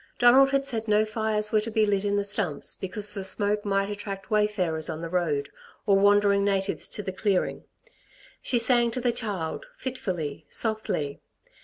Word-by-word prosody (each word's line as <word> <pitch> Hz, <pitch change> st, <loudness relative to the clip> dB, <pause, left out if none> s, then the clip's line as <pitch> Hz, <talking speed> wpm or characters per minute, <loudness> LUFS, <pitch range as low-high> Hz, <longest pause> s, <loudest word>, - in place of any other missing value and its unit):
Donald 260 Hz, +3 st, +6 dB
had 275 Hz, 0 st, 0 dB
said 230 Hz, -4 st, 0 dB
no 210 Hz, 0 st, +3 dB
fires 215 Hz, -1 st, -1 dB
were 215 Hz, -, +3 dB
to 220 Hz, -, -5 dB
be 220 Hz, -1 st, +2 dB
lit 200 Hz, -1 st, 0 dB
in 200 Hz, 0 st, 0 dB
the 205 Hz, -, +1 dB
stumps 200 Hz, -7 st, -1 dB
because 205 Hz, +2 st, -1 dB
the 200 Hz, -2 st, -4 dB
smoke 205 Hz, +2 st, +1 dB
might 195 Hz, -1 st, 0 dB
attract 200 Hz, -1 st, -7 dB
wayfarers 190 Hz, -7 st, +1 dB
on 155 Hz, -, -4 dB
the 165 Hz, 0 st, -6 dB
road, 155 Hz, -6 st, 0 dB, 0.4 s
or 200 Hz, -3 st, +4 dB
wandering 200 Hz, 0 st, +4 dB
natives 195 Hz, -1 st, -1 dB
to 210 Hz, -, -3 dB
the 190 Hz, -, -5 dB
clearing. 195 Hz, -1 st, -1 dB, 0.8 s
She 245 Hz, -, +1 dB
sang 235 Hz, 0 st, +4 dB
to 235 Hz, -, -4 dB
the 245 Hz, -1 st, +1 dB
child, 210 Hz, -, -3 dB
fitfully, 175 Hz, -, -5 dB
softly. 215 Hz, -10 st, -1 dB
205 Hz, 175 wpm, -26 LUFS, 190-220 Hz, 0.8 s, Donald